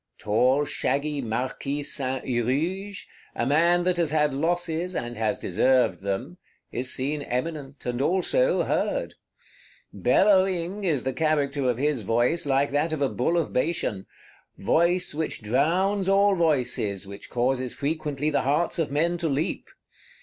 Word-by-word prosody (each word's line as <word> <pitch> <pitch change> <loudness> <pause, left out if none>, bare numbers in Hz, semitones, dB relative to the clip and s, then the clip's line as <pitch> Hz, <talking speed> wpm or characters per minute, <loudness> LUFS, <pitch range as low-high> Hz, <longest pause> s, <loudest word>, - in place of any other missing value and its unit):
Tall 130 +7 +2
shaggy 145 +1 -1
Marquis 130 +5 -3
Saint 130 -2 -2
Huruge, 160 - -2 0.3
a - - -1
man 170 +5 +3
that 180 0 +1
has 170 -3 +1
had 150 -2 +1
losses, 170 +3 -1
and 120 0 -4
has 115 +3 -1
deserved 125 -9 +2
them, 110 - -4 0.3
is 130 +2 -1
seen 145 +3 -2
eminent, 140 +1 -4
and 125 +1 -2
also 475 - +2
heard. - - -1 0.8
"Bellowing" 190 -1 +2
is 150 -8 +1
the 130 - -2
character 145 -4 0
of 120 - 0
his 145 -2 0
voice, 120 - +1
like 140 +1 +2
that 150 +3 +1
of 155 -2 -3
a 135 - +2
Bull 165 +8 0
of 165 - -1
Bashan; 125 - -1 0.5
voice 170 - +1
which 155 -6 -3
drowns 180 - +1
all 200 +1 +4
voices, 125 - 0
which 100 +1 -10
causes 125 +1 0
frequently 150 0 -2
the 145 - +1
hearts 150 +6 0
of 160 - 0
men 170 +5 0
to 165 -2 -1
leap. 145 +5 -2
145 Hz, 145 wpm, -25 LUFS, 130-170 Hz, 0.8 s, all